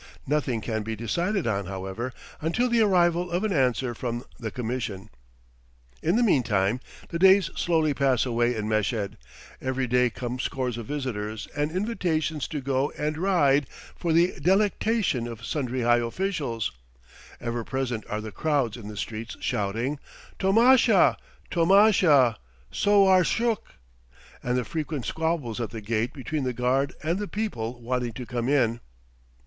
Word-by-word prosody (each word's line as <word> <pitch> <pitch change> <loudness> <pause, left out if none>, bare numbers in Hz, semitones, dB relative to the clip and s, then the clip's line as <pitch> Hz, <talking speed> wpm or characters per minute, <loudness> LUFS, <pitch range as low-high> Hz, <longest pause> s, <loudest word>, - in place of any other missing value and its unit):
Nothing 130 -5 0
can 110 +1 -2
be 110 +1 -4
decided 170 - -1
on, 100 -4 -1
however, 95 +6 -4 0.3
until 170 +11 +1
the 235 -1 +3
arrival 175 -3 +3
of 175 +3 -1
an 215 -2 0
answer 125 -3 +1
from 120 +1 -4 0.2
the 115 - -3
Commission. 110 -3 -4 0.9
In 170 +5 +1
the 240 - +3
meantime, 120 - +2 0.3
the 170 - -3
days 190 -1 +6
slowly 160 -3 +1
pass 135 -3 +2
away 120 0 +1
in 105 -1 -3
Meshed; 110 -1 -1 0.5
every 130 0 -1
day 125 0 +3
come 125 +2 -5
scores 125 -3 -2
of 115 - -7
visitors 110 -7 -4
and 145 +1 0
invitations 165 - -1
to 150 -3 -4
go 135 +1 0
and 150 +1 -1
ride 145 -8 +3 0.3
for 170 - -2
the 170 +3 +4
delectation 200 - +1
of 115 -1 -8
sundry 130 -4 -2
high 120 0 +4
officials; 120 - -2 0.7
ever 120 0 -3
present 125 -3 -3
are 105 0 -2
the 110 0 -7
crowds 140 -7 0
in 110 -4 -9
the 105 -1 -8
streets 110 +2 -5
shouting, 115 +8 -2 0.4
"Tomasha! 225 +1 +5 0.4
tomasha! 170 - +5 0.3
Sowar 195 -2 +5
shuk!" 230 +4 -1 0.7
and 125 0 0
the 125 - -1
frequent 150 -5 -4
squabbles 160 -8 -2
at 115 - -2
the 115 - -6
gate 110 +2 -1
between 150 +1 -4
the 125 -1 -1
guard 130 +3 0
and 170 +5 0
the 205 - -3
people 125 - -3
wanting 120 0 -2
to 125 +2 -7
come 120 0 -2
in. 120 -5 +2
130 Hz, 150 wpm, -26 LUFS, 115-170 Hz, 0.9 s, days